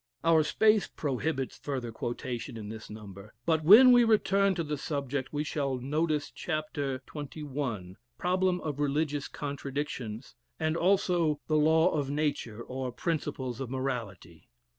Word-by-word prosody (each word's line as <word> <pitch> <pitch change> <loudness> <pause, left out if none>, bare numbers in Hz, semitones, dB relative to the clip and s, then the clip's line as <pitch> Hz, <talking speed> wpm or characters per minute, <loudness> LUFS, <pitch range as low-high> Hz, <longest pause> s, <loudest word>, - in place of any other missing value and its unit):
Our 165 -1 +5
space 215 +7 +3
prohibits 135 -1 -2
further 130 -5 -4
quotation 120 +1 -4
in 105 -2 -7
this 110 0 -8
number; 105 -1 -10
but 160 -2 +2
when 225 +10 +9
we 245 -1 +7
return 200 -3 +3
to 170 - -1
the 150 -1 -2
subject, 140 -2 -3
we 150 0 -1
shall 140 -3 -1
notice 150 +3 -1
chapter 145 -4 -3
xxi., 140 - -5 0.2
"Problem 185 0 +1
of 145 -3 -4
Religious 145 0 0
Contradictions," 140 -5 -5 0.3
and 155 0 0
also 175 -4 +2
"The 155 - 0
Law 160 +3 +4
of 145 -3 -1
Nature; 140 -6 -2
or 130 0 -4
Principles 130 -3 -3
of 130 - -4
Morality." 115 -11 -5
145 Hz, 140 wpm, -29 LUFS, 130-160 Hz, 0.3 s, when